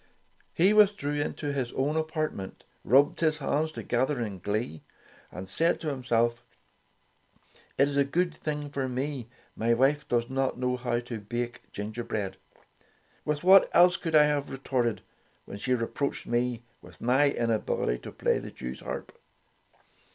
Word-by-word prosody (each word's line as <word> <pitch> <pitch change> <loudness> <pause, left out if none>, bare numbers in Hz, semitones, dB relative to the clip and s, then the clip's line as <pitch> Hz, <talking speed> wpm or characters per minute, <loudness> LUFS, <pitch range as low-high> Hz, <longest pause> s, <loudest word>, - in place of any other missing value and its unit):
He 190 +5 +4
withdrew 195 -9 +3
into 145 -1 -3
his 130 -4 -2
own 145 +4 0
apartment, 155 - -3 0.2
rubbed 140 +4 +4
his 155 -1 +2
hands 155 +2 0
together 130 -1 -1
in 105 -5 -4
glee 105 -5 -3 0.5
and 95 +1 -7
said 165 - +1
to 160 - -2
himself: 120 -3 0 1.3
"It's 140 +1 +2
a 140 - +5
good 170 +5 0
thing 150 -2 -4
for 135 -2 -2
me 130 -1 -3 0.3
my 115 +1 +2
wife 140 +4 +2
does 120 -1 +1
not 135 0 -1
know 125 0 0
how 120 -1 -1
to 120 -2 -6
bake 120 +3 -4
ginger 110 +3 -5
bread! 100 -4 -3 0.9
With 150 +1 -1
what 190 +1 +7
else 180 +1 +7
could 165 -2 -2
I 150 - +8
have 145 -1 0
re 135 - -5
torted 125 -4 -1 0.4
when 100 - -8
she 125 +4 +1
reproached 125 +4 -2
me 120 -1 -1 0.2
with 85 -2 -15
my 130 +4 +3
inability 115 - 0
to - - -9
play - - +1
the - - -8
Jewsharp 65 0 -6
130 Hz, 150 wpm, -28 LUFS, 120-150 Hz, 1.3 s, I